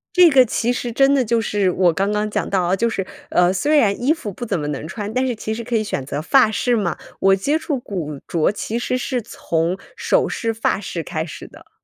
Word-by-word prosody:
这 360 -2 +8
个 270 -4 +6
其 235 +1 0
实 240 0 -3
真 270 +4 +4
的 270 -2 +3
就 235 0 +1
是 205 -3 +1
我 180 -1 +3
刚 195 +4 0
刚 210 0 0
讲 - - -2
到 190 -2 +1
啊， 175 +2 +2
就 230 +4 +1
是， 195 -4 -3 0.2
呃， 180 +1 +3
虽 295 +11 +2
然 205 -7 +2
衣 265 +5 +3
服 270 -11 -3
不 240 - -8
怎 200 - -1
么 150 - -3
能 150 +1 -4
穿， 210 +4 -5
但 255 +1 +1
是 245 - -1
其 220 0 -4
实 235 +1 -5
可 240 +1 -3
以 220 - +2
选 175 -10 -3
择 140 - -3
发 250 - +4
饰 240 +3 +1
嘛。 195 -8 -1 0.2
我 195 0 +5
接 285 +11 0
触 290 -4 -2
古 160 - -5
着 165 0 +1
其 215 +2 -3
实 250 +1 -1
是 250 0 -2
从 170 -3 -2 0.2
首 - - +1
饰、 230 - -2
发 225 -3 0
饰 180 -4 -5
开 160 -2 -3
始 160 - -9
的。 - - -17
215 Hz, 270 characters per minute, -20 LUFS, 185-245 Hz, 0.2 s, 这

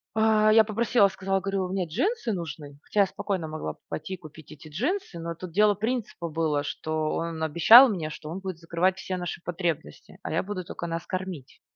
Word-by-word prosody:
а 220 -1 +4
я 220 0 +6
попросила 220 -1 +3
и - - -4
сказала, 195 0 -1
говорю: 195 -1 -2
"Мне 190 -1 -1
джинсы 275 - -1
нужны". 150 -4 -7
Хотя 210 - +1
я - - +6
спокойно 190 -3 -3
могла 155 0 -5
бы - - -30
пойти 190 - -5
и - - -14
купить 155 -2 -13
эти 150 +1 -12
джинсы, 245 - -2
но 165 0 -5
тут 180 +1 -8
дело 210 +4 +4
принципа 220 -4 -3
было, 155 -2 0
что 155 +1 -2
он 165 -1 -3
обещал 170 - +8
мне, 170 -8 -2
что 155 0 -8
он 175 +4 -5
будет 190 -3 -5
закрывать 170 +3 0
все 190 -1 -4
наши 175 -1 -5
потребности, 170 -3 -4
а - - -4
я 160 - 0
буду 190 -2 -5
только 170 - -6
нас 165 0 -4
кормить. 185 -7 -6
180 Hz, 210 wpm, -26 LUFS, 160-205 Hz, -, обещал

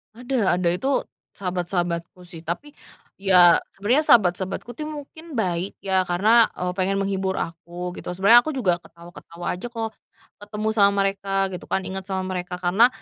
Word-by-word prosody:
Ada 240 -7 0
ada. 180 -1 +1
Itu 265 +10 0 0.3
sahabat-sahabatku 175 -1 -3
sih, 175 -2 -11
tapi 175 - -5 0.5
iya 180 -3 +6 0.2
sebenarnya 240 +10 +2
sahabat-sahabatku 190 +1 +2
tuh 305 +3 -5
mungkin 310 +1 -9
baik 180 -1 -2
ya 190 -1 +2
karena, 215 +6 +4
eee, 180 0 -2
pengen 195 +1 0
menghibur 195 -1 -1
aku 175 +2 -5
gitu. - - -11
Sebenarnya 200 +6 +7
aku 310 - -3
juga 180 -9 +1
ketawa-ketawa 170 0 -12
aja 215 +7 -6
kalau 225 -2 -4 0.5
ketemu 210 +1 -5
sama 200 -2 +5
mereka 195 0 0
gitu 180 - -7
kan, 190 - -1
inget 190 0 -5
sama 190 -1 -2
mereka 180 -1 -4
karena 190 +7 +4
190 Hz, 155 wpm, -23 LUFS, 180-220 Hz, 0.5 s, Sebenarnya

